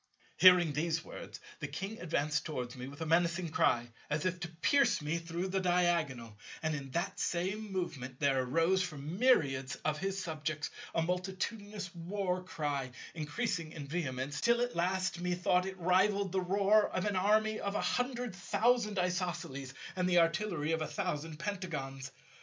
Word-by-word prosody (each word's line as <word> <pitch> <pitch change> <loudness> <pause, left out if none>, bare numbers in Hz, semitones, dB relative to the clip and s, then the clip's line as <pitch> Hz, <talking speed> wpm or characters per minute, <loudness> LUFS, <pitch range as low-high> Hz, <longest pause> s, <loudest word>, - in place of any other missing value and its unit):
Hearing 180 -4 +7
these 165 +2 0
words - - -8 0.2
the 150 - -3
King 195 +9 -5
advanced 155 -3 0
towards 125 -6 -4
me 125 0 -6
with 140 +3 -10
a - - -1
menacing 170 +1 +2
cry 120 -5 +2 0.2
as 150 +2 -1
if 180 0 0
to 175 - -3
pierce 175 - +3
me 155 +2 -1
through 170 +3 -3
the 190 +1 +1
diagonal; 170 - +1 0.2
and 155 0 +1
in 140 -2 -4
that 175 +8 -2
same 195 +4 -1
movement 135 -9 -4
there 135 -3 +3
arose 165 +9 +2
from 160 0 -4
myriads 135 - +3
of 150 -1 +1
his 195 +1 -2
subjects 155 -3 -3 0.2
a 165 - +3
multitudinous 190 +2 -3
war 180 +1 -2
cry, 145 -7 -2 0.2
increasing 165 +1 -2
in 150 -3 -6
vehemence 140 -3 -3
till 235 0 +4
at 245 0 -1
last 185 +1 0
methought 180 +1 +2
it 190 0 -6
rivalled 190 +2 +3
the 190 0 +1
roar 200 +3 +4
of 185 - -2
an 205 -2 0
army 215 +3 +3
of 200 0 -3
a - - +1
hundred 250 -2 -1
thousand 220 +2 +1
Isosceles, 170 -7 -2 0.2
and 180 -1 +1
the 175 - +4
artillery 165 -2 +2
of 160 -1 0
a 155 - -1
thousand 165 -5 -3
Pentagons. 150 -8 -4
175 Hz, 165 wpm, -33 LUFS, 150-190 Hz, 0.2 s, Hearing